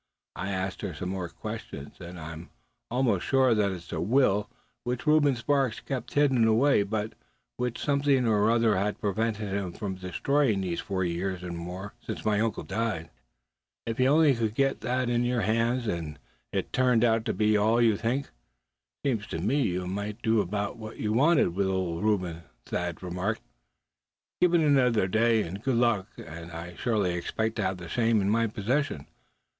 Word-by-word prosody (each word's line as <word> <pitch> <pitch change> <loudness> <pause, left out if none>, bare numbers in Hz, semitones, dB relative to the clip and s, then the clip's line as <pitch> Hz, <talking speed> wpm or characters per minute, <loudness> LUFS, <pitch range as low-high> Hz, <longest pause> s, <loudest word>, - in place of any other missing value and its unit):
I 95 - -4
asked 95 -1 -3
her 90 - -4
some 90 +5 -4
more 95 -2 -3
questions, 70 -3 -7
and 85 0 -8
I'm 80 +1 -8 0.4
almost 120 -6 +1
sure 130 -2 +4
that 105 -2 +2
it's 85 -3 -8
a 80 - -2
will 105 0 +2 0.3
which 125 +2 -3
Reuben 150 -3 +4
Sparks 135 0 0
kept 125 -3 -5
hidden 135 -6 +4
away, 115 +2 +4
but 105 +2 -2 0.4
which 125 -1 -2
something 140 -3 +2
or 105 -1 +3
other 115 -3 +3
has 100 +2 0
prevented 105 0 -2
him 95 -3 -2
from 100 -3 -4
destroying 105 +5 0
these 90 -3 -2
four 95 -2 -2
years 90 +1 -2
and 90 -1 -5
more, 90 +4 -6
since - - -6
my 105 -1 +2
uncle 110 -1 -1
died." 110 -8 -3 0.7
"If 115 +1 -4
you 130 - +4
only 150 0 +5
could 110 -3 -1
get 135 +1 +1
that 125 0 0
in 120 0 +1
your 120 -1 +1
hands, 115 +4 +1
and 80 -7 -3 0.3
it - - -3
turned 125 -3 +3
out 115 -1 +3
to - - 0
be 105 0 +3
all 110 +3 +3
you 115 -3 +4
think, 120 +7 -2 0.7
seems 115 -7 0
to - - -4
me 110 - +1
you 90 -6 -1
might 100 +4 -4
do 110 -2 +3
about 100 +4 -3
what 110 -1 -8
you 105 0 -1
wanted 140 - +4
with 100 0 +1
old 95 -2 -1
Reuben," 90 -6 0 0.2
Thad 85 0 -3
remarked. 90 +5 -2 1.0
"Given 175 -2 +4
another 125 -9 +3
day, 110 +2 +3
and 95 +5 -6
good 130 +1 0
luck, 115 -5 +2
suh, - - -8
and 85 +2 -9
I 85 +1 -7
surely 100 -2 0
expect 110 +6 -2
to - - 0
have 95 -1 -1
the 85 -1 -8
same 115 +2 +2
in 100 0 +1
my 115 +1 +2
possession. 110 - -1
110 Hz, 180 wpm, -28 LUFS, 95-120 Hz, 1.0 s, only